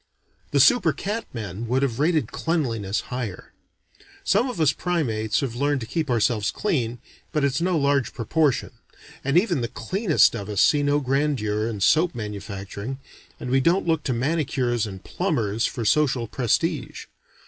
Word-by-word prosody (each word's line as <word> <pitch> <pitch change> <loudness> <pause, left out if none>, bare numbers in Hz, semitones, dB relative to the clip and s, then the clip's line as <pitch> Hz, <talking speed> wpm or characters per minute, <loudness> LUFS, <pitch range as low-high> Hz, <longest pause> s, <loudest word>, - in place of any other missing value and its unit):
The 145 - +1
super 160 - +5
cat 210 - -3
men 110 -1 -5
would 130 +4 +1
have 125 -3 -1
rated 155 +1 +1
cleanliness 115 - -1
higher. 120 -7 -5 0.7
Some 225 +7 +2
of 245 - -6
us 155 -4 +4
primates 115 -12 -1
have 135 -5 -2
learned 140 +3 0
to - - -4
keep 155 +4 -2
ourselves 115 -3 +1
clean, 125 - -1 0.3
but 150 - 0
it's 140 +2 +1
no 180 -1 +1
large 140 -3 +1
proportion; 140 +4 0 0.5
and 140 +4 +2
even 175 - +2
the 120 - -1
cleanest 185 - +2
of 100 0 -6
us 105 -3 -2
see 145 - +4
no 145 +1 +2
grandeur 130 -6 0
in 105 -4 -5
soap 160 - +3
manufacturing, 100 +2 -6 0.4
and 125 - -5
we 135 - +4
don't 170 +8 +2
look 165 -2 +1
to 135 - 0
manicures 125 -4 0
and 95 -2 -9
plumbers 115 - -1
for 115 - -4
social 130 -2 +2
prestige. 135 - -1
135 Hz, 160 wpm, -24 LUFS, 115-155 Hz, 0.7 s, super